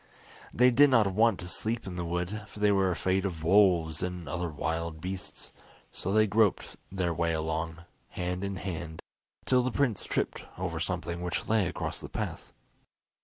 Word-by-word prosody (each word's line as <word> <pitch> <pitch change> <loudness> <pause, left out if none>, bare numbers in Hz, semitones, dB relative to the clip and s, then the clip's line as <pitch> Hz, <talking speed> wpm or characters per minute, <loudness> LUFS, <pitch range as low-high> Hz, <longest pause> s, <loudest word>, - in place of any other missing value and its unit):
They 125 +2 +5
did 145 +4 +6
not 115 -5 +5
want 110 0 +3
to 90 - -6
sleep 110 +6 -1
in 95 -2 -6
the 90 - -2
wood, 90 +5 -2
for 105 - -12
they 105 0 +4
were 95 -1 +3
afraid 95 +2 +1
of 85 -5 -3
wolves 85 -4 +4
and 90 -3 -4
other 85 +3 -2
wild 80 +1 -3
beasts, 95 +2 -6 0.4
so 95 - -3
they 110 +1 +5
groped 105 -1 +2 0.2
their 90 -3 0
way 85 0 0
along, 80 +1 -2 0.3
hand 90 +1 -3
in 100 0 -2
hand, 85 -3 -5 0.4
till 125 -1 +4
the 125 - 0
prince 125 -5 +1
tripped - - -2
over - - -3
something 85 +1 -3
which 90 -2 -2
lay 110 -4 +3
across 90 - -4
the - - -8
path. - - -5
90 Hz, 175 wpm, -29 LUFS, 85-105 Hz, 0.4 s, did